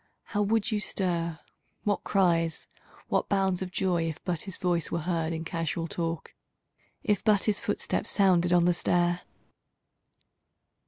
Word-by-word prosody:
How 210 Hz, -, -2 dB
would 220 Hz, +2 st, +1 dB
you 215 Hz, -, +1 dB
stir, 170 Hz, -5 st, -1 dB, 0.5 s
what 205 Hz, -1 st, 0 dB
cries, 170 Hz, -4 st, +1 dB, 0.4 s
what -, -, 0 dB
bounds 190 Hz, -2 st, +1 dB
of 185 Hz, -, -3 dB
joy. 175 Hz, -3 st, 0 dB
If 155 Hz, -, -6 dB
but 175 Hz, -4 st, -2 dB
his 190 Hz, -3 st, -6 dB
voice 175 Hz, -2 st, 0 dB
were 170 Hz, -, -2 dB
heard 165 Hz, -1 st, -1 dB
in 165 Hz, 0 st, -3 dB
casual 165 Hz, 0 st, -2 dB
talk. 165 Hz, -1 st, -3 dB, 0.7 s
If 210 Hz, -4 st, +1 dB
but 210 Hz, -3 st, +4 dB
his 210 Hz, -2 st, +2 dB
footstep -, -, -1 dB
sounded 180 Hz, -3 st, +3 dB
on 175 Hz, -1 st, +5 dB
the 175 Hz, -, +4 dB
stair! 175 Hz, +1 st, +1 dB
175 Hz, 150 wpm, -28 LUFS, 170-195 Hz, 0.7 s, on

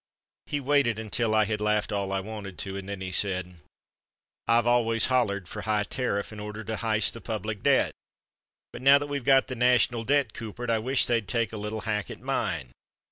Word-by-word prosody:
He 145 Hz, -, -1 dB
waited 140 Hz, -5 st, +2 dB
until 110 Hz, +1 st, 0 dB
I 110 Hz, 0 st, +4 dB
had 105 Hz, 0 st, -2 dB
laughed 105 Hz, 0 st, +1 dB
all 100 Hz, -1 st, -1 dB
I 95 Hz, 0 st, 0 dB
wanted 100 Hz, -2 st, -7 dB
to 95 Hz, 0 st, -4 dB
and 100 Hz, 0 st, -6 dB
then 100 Hz, -1 st, -5 dB
he 95 Hz, -1 st, -4 dB
said: 95 Hz, -2 st, -1 dB, 0.9 s
"I've 115 Hz, 0 st, +4 dB
always 115 Hz, -2 st, +3 dB
hollered 100 Hz, -7 st, +1 dB
for 105 Hz, -, -6 dB
high 105 Hz, -1 st, +1 dB
terriff 105 Hz, -3 st, -2 dB
in 105 Hz, -, -8 dB
order 105 Hz, +1 st, -6 dB
to 110 Hz, 0 st, -4 dB
hyst 110 Hz, -2 st, +1 dB
the 115 Hz, -, -9 dB
public 110 Hz, -2 st, -4 dB
debt, -, -, +3 dB, 0.8 s
but -, -, -8 dB
now 140 Hz, +2 st, +7 dB
that 145 Hz, -, -3 dB
we've 145 Hz, -2 st, -4 dB
got 135 Hz, +1 st, +5 dB
the 130 Hz, -, -5 dB
national 125 Hz, -1 st, +3 dB
debt 140 Hz, -2 st, +1 dB
coopered 115 Hz, +2 st, -5 dB
I 115 Hz, -, +2 dB
wish 130 Hz, +3 st, +1 dB
they'd 115 Hz, -4 st, 0 dB
take 115 Hz, -2 st, -1 dB
a -, -, -4 dB
little 105 Hz, +1 st, -4 dB
hack 105 Hz, -1 st, -2 dB
at -, -, -8 dB
mine. 65 Hz, -2 st, -2 dB
110 Hz, 205 wpm, -27 LUFS, 105-120 Hz, 0.9 s, now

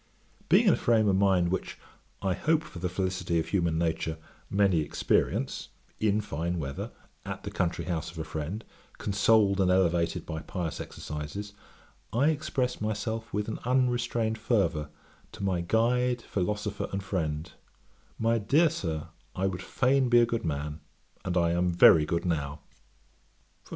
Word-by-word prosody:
Being -, -, +6 dB
in -, -, +6 dB
a -, -, +1 dB
frame 110 Hz, -3 st, +3 dB
of 100 Hz, -, +3 dB
mind 95 Hz, -3 st, +3 dB
which, 95 Hz, -, -3 dB, 0.5 s
I 95 Hz, -1 st, +2 dB
hope 155 Hz, -, +1 dB
for 155 Hz, -, -10 dB
the 90 Hz, +1 st, -1 dB
felicity 90 Hz, -2 st, -1 dB
of 80 Hz, -, -3 dB
human 85 Hz, -5 st, +1 dB
nature, 80 Hz, -1 st, -1 dB, 0.3 s
many 100 Hz, -4 st, +3 dB
experience, 75 Hz, -, 0 dB, 0.3 s
in 105 Hz, 0 st, +2 dB
fine 85 Hz, -2 st, -3 dB
weather, 70 Hz, -4 st, -4 dB, 0.3 s
at -, -, -6 dB
the -, -, -5 dB
country 85 Hz, -1 st, -1 dB
house 80 Hz, -2 st, -2 dB
of 85 Hz, -, -12 dB
a 80 Hz, -, -2 dB
friend, 80 Hz, +7 st, -5 dB, 0.3 s
consoled 100 Hz, 0 st, +3 dB
and 95 Hz, -, +3 dB
elevated 85 Hz, -2 st, +2 dB
by 80 Hz, -1 st, -4 dB
pious 85 Hz, -3 st, -4 dB
exercises, 75 Hz, +8 st, -6 dB, 0.6 s
I 135 Hz, +7 st, +3 dB
expressed 140 Hz, -6 st, -1 dB
myself 110 Hz, +1 st, -3 dB
with 105 Hz, 0 st, -2 dB
an 110 Hz, -, -4 dB
unrestrained 120 Hz, -3 st, +1 dB
fervour 85 Hz, -10 st, +1 dB, 0.4 s
to 110 Hz, -2 st, -7 dB
my 95 Hz, -3 st, +1 dB
'Guide, 120 Hz, +5 st, +1 dB
Philosopher, 105 Hz, +1 st, -2 dB
and 100 Hz, 0 st, -3 dB
Friend;' 80 Hz, -5 st, -2 dB, 0.7 s
'My 115 Hz, +1 st, +2 dB
dear 150 Hz, +9 st, +3 dB
Sir, 80 Hz, -, -4 dB, 0.3 s
I 95 Hz, -, 0 dB
would 95 Hz, -1 st, -2 dB
fain 130 Hz, +5 st, +2 dB
be 120 Hz, 0 st, +6 dB
a 120 Hz, -, +5 dB
good 115 Hz, -1 st, -2 dB
man; 75 Hz, -1 st, -3 dB, 0.4 s
and 90 Hz, -1 st, -1 dB
I 85 Hz, -1 st, +3 dB
am 90 Hz, +1 st, +2 dB
very 80 Hz, -3 st, +7 dB
good 85 Hz, +3 st, -1 dB
now. 75 Hz, -4 st, -2 dB
95 Hz, 155 wpm, -28 LUFS, 85-110 Hz, 0.7 s, very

